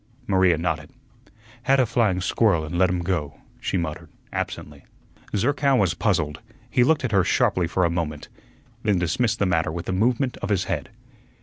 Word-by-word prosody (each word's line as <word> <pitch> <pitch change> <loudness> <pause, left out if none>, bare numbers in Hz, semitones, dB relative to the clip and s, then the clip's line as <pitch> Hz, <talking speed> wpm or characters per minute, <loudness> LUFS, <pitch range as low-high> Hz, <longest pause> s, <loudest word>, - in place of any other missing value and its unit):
Maria 95 -5 +3
nodded. 80 -1 -2 0.7
"Had 135 +2 +3
a 130 - +4
flying 110 -5 +1
squirrel 100 -4 +2
an' 80 - -6
let 90 +1 +3
him 90 -1 -1
go," 80 -5 -2 0.2
she - - -1
muttered, 80 -3 -4 0.2
absently. 70 -1 -5 0.5
Zerkow 140 +5 +2
was 95 -7 +2
puzzled; 80 -7 0 0.3
he 125 - +4
looked 155 +2 +2
at 125 - -2
her 100 -3 +4
sharply 90 0 +2
for 90 +2 +1
a - - +2
moment, 80 -3 -3 0.5
then 105 -3 +2
dismissed 110 +7 0
the 100 - +1
matter 80 -4 +1
with 85 +1 -6
a - - -1
movement 120 +6 +1
of 100 - -5
his 100 -2 +1
head. 80 -7 -3
95 Hz, 180 wpm, -24 LUFS, 85-110 Hz, 0.7 s, a